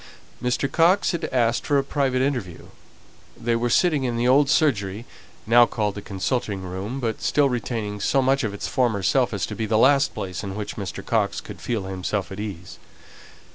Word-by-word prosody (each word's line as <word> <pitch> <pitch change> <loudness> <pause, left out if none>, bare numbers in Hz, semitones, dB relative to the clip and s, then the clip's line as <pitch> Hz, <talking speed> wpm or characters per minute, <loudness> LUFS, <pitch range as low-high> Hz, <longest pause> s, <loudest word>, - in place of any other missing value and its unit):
Mr. 125 +2 0
Coxe 175 +6 +3
had 170 -2 -3
asked 120 -2 +1
for 145 - +1
a 135 - +2
private 135 -2 0
interview; 125 -11 -3 0.7
they 115 0 0
were 120 +1 0
sitting 155 -1 +3
in 120 -2 -1
the 120 +1 +1
old 140 +2 +4
surgery, 110 -9 +1 0.4
now 120 +1 +6
called 105 -3 -1
the 100 - -7
consulting 100 0 -2
room, 95 +8 -5
but 115 -4 -3
still 145 -2 +2
retaining 115 -4 -3
so 135 - +1
much 135 +1 +2
of 110 - -1
its 100 - -5
former 115 -6 0
self 130 +4 +2
as 100 -3 -2
to - - -7
be 110 +1 -3
the 110 0 +2
last 140 +4 +4
place 90 +1 -5
in 100 -1 -5
which 105 -1 -5
Mr. 100 -3 -6
Coxe - - 0
could - - -10
feel 115 -5 -2
himself 95 0 -3
at 95 - -7
ease. 95 -5 -7
115 Hz, 195 wpm, -23 LUFS, 100-135 Hz, 0.7 s, now